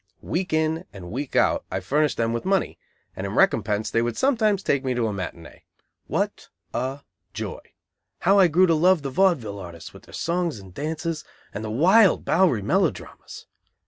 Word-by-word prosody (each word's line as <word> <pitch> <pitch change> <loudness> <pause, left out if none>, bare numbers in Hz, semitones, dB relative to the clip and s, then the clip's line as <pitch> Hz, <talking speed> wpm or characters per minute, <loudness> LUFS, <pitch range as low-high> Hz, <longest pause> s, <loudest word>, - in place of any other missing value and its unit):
Week 180 +2 -2
in 160 +1 0
and 90 -3 -10
week 135 +4 -5
out - - +3
I - - -2
furnished 150 +1 0
them 115 0 0
with 115 - -3
money, 195 -1 0 0.4
and - - -4
in - - -5
recompense 105 +1 +2
they 115 - +2
would 120 -1 -2
sometimes 215 -7 +2
take 140 -1 +1
me 130 -1 -1
to 120 -1 0
a 110 - -1
matinée. 90 -4 -7 0.5
What - - -2 0.2
a 130 +3 -3 0.3
joy! - - -5 0.6
How 195 +2 +4
I 185 - +7
grew 175 +4 +4
to 170 - +3
love 170 0 +3
the 135 - -3
vaudeville 130 - +1
artists 85 -3 -10
with - - -13
their - - -17
songs 170 -4 -1
and 95 -3 -13
dances, 160 - -3 0.3
and 105 - -5
the 110 - -4
wild 185 - +4
Bowery 165 - +3
melodramas! - - -2
150 Hz, 180 wpm, -24 LUFS, 115-180 Hz, 0.6 s, I